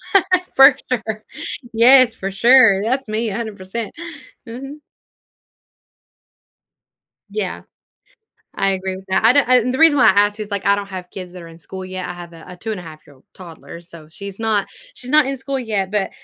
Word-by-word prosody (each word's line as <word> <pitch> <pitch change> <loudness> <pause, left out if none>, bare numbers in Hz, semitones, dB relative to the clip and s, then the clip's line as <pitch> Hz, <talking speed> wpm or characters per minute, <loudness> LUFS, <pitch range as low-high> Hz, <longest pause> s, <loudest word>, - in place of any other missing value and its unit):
Right? 370 -1 +3
For 270 0 +8 0.2
sure. 220 -3 -3 0.5
Yes, 245 +1 +5
for 195 -1 -5
sure, 230 -2 +5
that's 260 +4 -1
me 220 +1 -2
100%. 210 0 -5 0.6
Mhm. 270 +6 -9 2.5
Yeah. 200 -3 -4 1.0
I 195 0 +2
agree 190 0 -3
with 190 0 -12
that. 190 - +1
I 225 +2 +6
don't 285 -2 +3
and 250 0 +3
the - - -2
reason 320 -2 +5
why - - +5
I - - +8
asked 205 +2 +2
is, 210 -1 -6
like, 200 -2 -4
I 200 - +4
don't 200 -1 -5
have 185 -2 -9
kids 185 -2 -8
that 180 -2 -10
are - - -11
in 165 0 -15
school 190 +3 -9
yet. 185 -1 -6
I - - -5
have 175 -1 -11
a 165 - -13
a 180 - -11
two 220 +5 -5
and 210 - -4
a - - -10
half 155 -2 -13
year 145 - -18
old 130 - -26
toddler, 170 -3 -12
so 170 -2 -15
she's 200 +4 -10
not 220 -3 0 0.3
she's 255 0 -9
not 300 -2 +4
in 275 0 -3
school 270 +1 -4
yet, 205 -6 -2
but, 210 -2 -1
205 Hz, 200 wpm, -19 LUFS, 185-245 Hz, 2.5 s, For